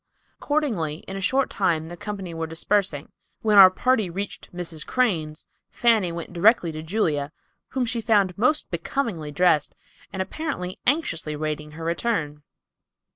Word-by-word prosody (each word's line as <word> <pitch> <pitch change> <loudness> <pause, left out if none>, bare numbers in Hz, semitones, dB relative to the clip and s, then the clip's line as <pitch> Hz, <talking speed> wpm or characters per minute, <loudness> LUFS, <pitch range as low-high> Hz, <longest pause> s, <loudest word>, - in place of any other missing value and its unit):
Accordingly 215 - -1
in 195 - -5
a 195 - -4
short 265 +8 +1
time 165 -5 0
the 175 - -7
company 195 -2 -6
were 165 0 -3
dispersing. 165 -2 0 0.3
When 210 -2 +5
our 190 -1 +11
party 220 0 +1
reached 195 +3 -6
Mrs. 170 -3 -5
Crane's, 165 -12 -1 0.2
Fanny 220 -7 +2
went 170 +1 -6
directly 180 -1 +4
to 155 0 -6
Julia, 155 -5 -1 0.4
whom 260 -2 -1
she 235 0 -1
found 205 -5 +2
most 300 +8 +1
becomingly 170 - -3
dressed, 155 -1 +2 0.4
and 190 - -6
apparently 190 - -4
anxiously 185 - 0
awaiting 150 0 -4
her 165 +1 -8
return. 165 -5 -1
180 Hz, 145 wpm, -24 LUFS, 160-220 Hz, 0.4 s, our